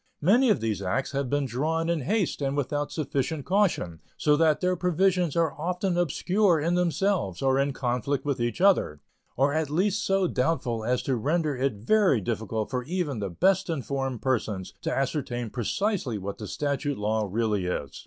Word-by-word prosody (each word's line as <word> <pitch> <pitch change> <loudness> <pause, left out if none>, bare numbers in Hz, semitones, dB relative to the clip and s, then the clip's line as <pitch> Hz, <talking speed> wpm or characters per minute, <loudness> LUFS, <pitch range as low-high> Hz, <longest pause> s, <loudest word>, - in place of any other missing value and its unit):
Many 235 - +5
of 210 - +2
these 110 -4 -1
acts 95 +8 -1
have 140 -2 -2
been 145 +1 +1
drawn 155 +7 -1
in 170 -1 +1
haste 195 - 0
and 140 0 -1
without 145 +1 -1
sufficient 145 0 -2
caution, 180 - +1 0.2
so 150 -1 +3
that 155 -1 +3
their 180 0 +1
provisions 180 -1 +1
are 165 -3 +2
often 180 +4 -2
obscure 175 +2 +2
in 165 +4 0
themselves 175 - 0
or 135 0 +3
in 140 +1 +1
conflict 130 +2 -2
with 140 -3 -1
each 120 +8 -2
other, 185 - +3 0.4
or 140 +3 +3
at 155 -2 0
least 195 +7 +1
so 195 -1 +2
doubtful 125 -7 -1
as 125 +2 0
to 135 - 0
render 150 +4 0
it 130 -2 0
very 140 - +3
difficult 110 +1 -3
for 125 -1 -1
even 160 -6 -2
the 100 -2 -3
best 190 - +2
informed 135 -5 -3
persons 110 -7 -1
to - - -2
ascertain 125 -4 -2
precisely 140 - -1
what 100 0 -6
the 105 - -6
statute 145 +1 -2
law 105 +1 0
really 105 -4 0
is. 75 -6 -3
140 Hz, 180 wpm, -27 LUFS, 120-175 Hz, 0.4 s, Many